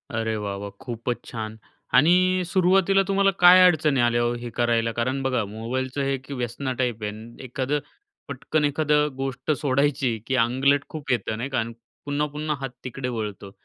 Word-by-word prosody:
अरे 110 0 -1
वाह, 100 -1 -3
वाह! 100 0 -6
खूपच 120 0 -3
छान 110 -2 -6 0.4
आणि 180 +5 +4
सुरुवातीला 190 +2 +3
तुम्हाला 195 0 +3
काय 180 +1 +9
अडचणी 155 -6 +3
आल्या 120 0 +2
हो, 120 0 +1
हे 120 0 -6
करायला. 115 -1 +1
कारण 130 +4 -1
बघा, 125 -4 0
मोबाईलचं 125 +6 -4
हे 135 0 0
की 135 +2 -10
व्यसना 125 +1 -3
टाइप 120 -4 -1
आहे 105 - -2
न 110 +2 -11
एखादं 130 +3 -2 0.5
पटकन 145 +3 -1
एखादं 150 0 +2
गोष्ट 135 +2 -2
सोडायची, 140 -3 +1
की 130 - 0
आंगलट 130 +4 +2
खूप 155 -4 -5
येतं 110 -2 -1
नाही 130 +4 -4
का 130 - 0
आणि 115 +1 -3 0.3
पुन्हा, 145 +1 0
पुन्हा 150 +1 -3
हात 135 - -3
तिकडे 125 0 -5
वळतो. 105 -4 -5
130 Hz, 175 wpm, -24 LUFS, 115-150 Hz, 0.5 s, काय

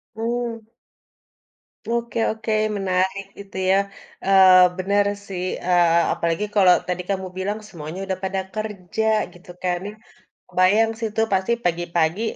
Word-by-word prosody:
Mmm. 230 -1 -3 1.2
Oke 235 0 -2
oke 220 0 -5 0.3
menarik 190 +1 0 0.2
itu 195 -1 -11
ya. 195 - +5 0.5
Eee, 185 -2 +7
bener 200 +2 +1 0.2
sih, 180 -2 -4 0.2
eee, 170 -1 +4
apalagi 170 +5 -1
kalau 185 -3 +6
tadi 180 0 -2
kamu 190 -1 -2
bilang 205 +3 -2
semuanya 165 0 -8
udah 190 -1 -3
pada 190 0 -1
kerja 215 -1 -4 0.3
gitu 175 0 -18
kan. 175 -1 0 0.7
Kebayang 205 +5 +3
sih 225 - -1
itu 220 +1 0
pasti 190 +5 +1
pagi-pagi, 170 +2 0
190 Hz, 125 wpm, -22 LUFS, 180-215 Hz, 1.2 s, Eee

